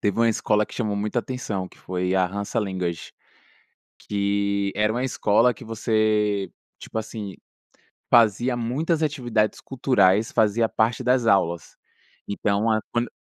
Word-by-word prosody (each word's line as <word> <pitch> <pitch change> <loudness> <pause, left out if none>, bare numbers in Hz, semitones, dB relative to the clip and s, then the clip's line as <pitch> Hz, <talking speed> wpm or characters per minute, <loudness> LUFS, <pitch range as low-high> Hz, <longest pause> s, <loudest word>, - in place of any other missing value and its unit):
teve 105 0 0
uma 115 0 +4
escola 105 -1 +1
que - - -12
chamou 110 -4 -1
muita 105 +4 -1
atenção 105 -8 -4
que - - -21
foi 90 0 -2
a 95 -1 +3
Hansa 100 +2 -3
Language, 90 -4 -3 0.9
que 100 -1 -1
era 105 +1 +2
uma 125 +2 -1
escola 115 -1 +2
que 120 - -12
você, 110 -3 0 0.3
tipo 110 - -5
assim, 105 -3 -6 0.8
fazia 120 +2 +4
muitas 150 +8 -1
atividades 120 -8 0
culturais 110 -5 +2
fazia 110 +1 +3
parte 115 +3 0
das 125 -2 +2
aulas. 85 -5 +1 0.5
Então 100 +2 0
a 110 - +2
quando 120 0 -1
105 Hz, 140 wpm, -24 LUFS, 100-120 Hz, 0.9 s, uma